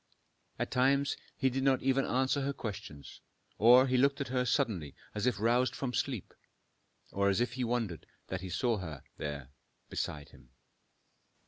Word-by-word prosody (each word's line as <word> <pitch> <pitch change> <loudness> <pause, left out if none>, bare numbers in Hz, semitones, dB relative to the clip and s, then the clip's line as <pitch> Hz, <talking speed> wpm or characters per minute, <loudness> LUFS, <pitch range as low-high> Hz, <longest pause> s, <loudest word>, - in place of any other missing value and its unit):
At - - -2
times 135 +2 +3 0.2
he 130 -2 +2
did 135 +2 -1
not 135 -1 +2
even 135 0 +2
answer 130 +2 +1
her 140 +1 -1
questions, 95 - -7 0.4
or 125 +4 +8
he 130 -1 +1
looked 140 +2 +3
at 140 - -3
her 125 0 +1
suddenly 110 - 0 0.2
as 105 +3 -1
if 120 -5 +1
roused 120 +4 +2
from 130 -2 -3
sleep, 125 -8 -2 0.8
or 100 0 +2
as 100 - +2
if 120 0 0
he 130 0 -2
wondered 115 - -2 0.2
that 95 -1 -4
he 95 - -6
saw 115 +5 +1
her 80 -8 -7 0.2
there 70 -3 -5 0.4
beside 75 -1 -3
him. - - -19
120 Hz, 165 wpm, -32 LUFS, 95-130 Hz, 0.8 s, or